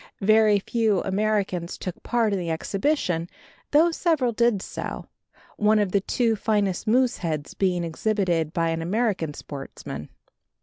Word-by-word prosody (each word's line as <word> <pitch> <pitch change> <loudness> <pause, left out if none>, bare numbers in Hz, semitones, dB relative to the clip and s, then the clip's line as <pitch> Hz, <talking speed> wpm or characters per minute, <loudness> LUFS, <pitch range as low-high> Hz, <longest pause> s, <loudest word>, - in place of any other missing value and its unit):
Very 215 +1 +5
few 215 -1 +1
Americans 195 -3 -1
took 185 - -6
part 230 -3 +1
in 195 - 0
the 170 -2 -3
exhibition, 180 - -1 0.4
though 320 +4 +5
several 315 -8 +1
did 235 -2 +2
so, - - -6 0.5
one 215 +1 +4
of 205 -3 +1
the 200 - +2
two 230 +3 +1
finest 205 -3 0
moose 250 +2 +3
heads 155 -4 -3
being 180 -3 0
exhibited 170 -2 0
by 165 0 0
an 165 0 -1
American 185 -4 -1
sportsman. 135 - -8
200 Hz, 140 wpm, -25 LUFS, 170-220 Hz, 0.5 s, Very